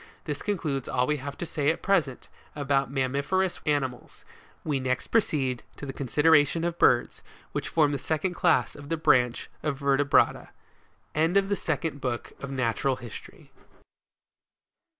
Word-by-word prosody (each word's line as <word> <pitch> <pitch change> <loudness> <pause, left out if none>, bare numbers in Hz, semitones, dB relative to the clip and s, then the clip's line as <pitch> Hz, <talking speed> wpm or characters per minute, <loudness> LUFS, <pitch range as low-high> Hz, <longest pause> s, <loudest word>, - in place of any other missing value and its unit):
This 150 -2 -4
concludes 155 -10 -2
all 125 - +1
we 150 +3 0
have 140 +1 -7
to - - -4
say 145 -3 0
at 160 - -1
present, 165 -10 +1 0.3
about 140 -2 +1
mammiferous 140 +8 0
animals; 135 -5 -2 0.4
we 145 -3 -1
next 130 -1 -1
preceed 135 - +1 0.2
to - - -7
the 135 - -5
consideration 150 +4 +3
of 170 0 -2
birds, 120 -1 +3 0.3
which - - -3
form 150 -3 +3
the 140 - -2
second 160 +4 -1
CLASS 175 -2 +2
of 145 0 -11
the 165 - 0
BRANCH 125 -6 +2
of 145 -3 -2
VERTEBRATA. 140 0 +2 0.6
END 165 +5 +2
OP 195 0 +3
THE 200 - +2
SECOND 160 -4 -3
BOOK 120 -2 -3
OP 140 - -4
NATURAL 130 0 0
HISTORY. 120 -3 -11
145 Hz, 150 wpm, -27 LUFS, 130-160 Hz, 0.6 s, consideration